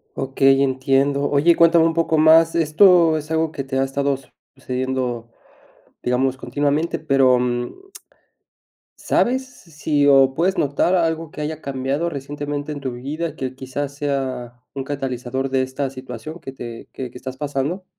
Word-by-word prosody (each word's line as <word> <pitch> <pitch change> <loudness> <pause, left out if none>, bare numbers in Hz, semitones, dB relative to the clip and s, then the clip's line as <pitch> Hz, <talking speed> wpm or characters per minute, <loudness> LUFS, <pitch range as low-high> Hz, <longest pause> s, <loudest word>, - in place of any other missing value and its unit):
Okey, 135 0 +3
entiendo. 135 +1 +1
Oye, 150 +4 +4
cuéntame 170 0 +5
un 165 - +2
poco 165 -1 +1
más, 160 +1 +5
esto 165 0 +5
es 150 +1 -7
algo 160 -1 +1
que 140 - -5
te 135 0 -3
ha 135 - +2
estado 140 0 -1 0.4
sucediendo, 125 -3 -3 0.7
digamos, 130 +1 +1
continuamente, 145 +5 -1
pero, 135 -4 +3
mm. 125 - -3 1.1
¿Sabes 255 -2 -1
s 165 - -19
si 145 -1 +1
o 135 -1 +5
puedes 185 +5 +1
notar 145 +5 +1
algo 165 -3 0
que - - -10
haya 155 +1 -4
cambiado 140 +5 -2
recientemente 145 +1 -5
en 145 - -7
tu 130 - -3
vida, 145 +7 -4
que 130 -1 -4
quizás 135 +2 -5
sea 130 -4 -3
un 135 - -4
catalizador 135 -1 -3
de 130 0 +1
esta 130 +1 -3
situación 130 +4 -9
que 135 - -7
te 120 -3 -9
que 130 -2 -6
que - - -12
estás 130 +1 -7
pasando? 145 +6 -3
140 Hz, 155 wpm, -21 LUFS, 130-155 Hz, 1.1 s, cuéntame